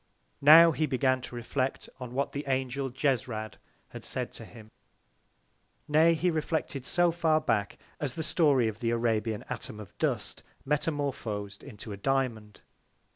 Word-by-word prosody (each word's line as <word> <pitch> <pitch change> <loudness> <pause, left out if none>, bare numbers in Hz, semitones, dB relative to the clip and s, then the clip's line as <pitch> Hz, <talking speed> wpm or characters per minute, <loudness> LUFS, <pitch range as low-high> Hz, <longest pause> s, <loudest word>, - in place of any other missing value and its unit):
Now 165 +4 +9
he 155 0 0
began 130 -1 +1
to 125 - -8
reflect 130 +3 -2
on 125 -1 -7
what 140 +1 0
the 140 - -4
Angel 135 0 -1
Jesrad 125 -4 -2 0.3
had - - -9
said - - -3
to - - -5
him: 110 -2 -14 1.2
Nay, 160 +2 +5
he 175 +3 +1
reflected 155 -4 -2
so 175 -1 +3
far 160 -2 +2
back 105 -9 -1 0.2
as 135 -4 -3
the 160 - -2
Story 145 -7 +3
of 110 -1 -4
the 115 -2 -1
Arabian 115 -2 0
Atom 115 -3 -6
of 105 - -11
Dust - - -2 0.2
metamorphosed 135 -9 -2
into 105 +1 -10
a 100 - -6
Diamond. 115 -4 -2
130 Hz, 150 wpm, -29 LUFS, 115-150 Hz, 1.2 s, Now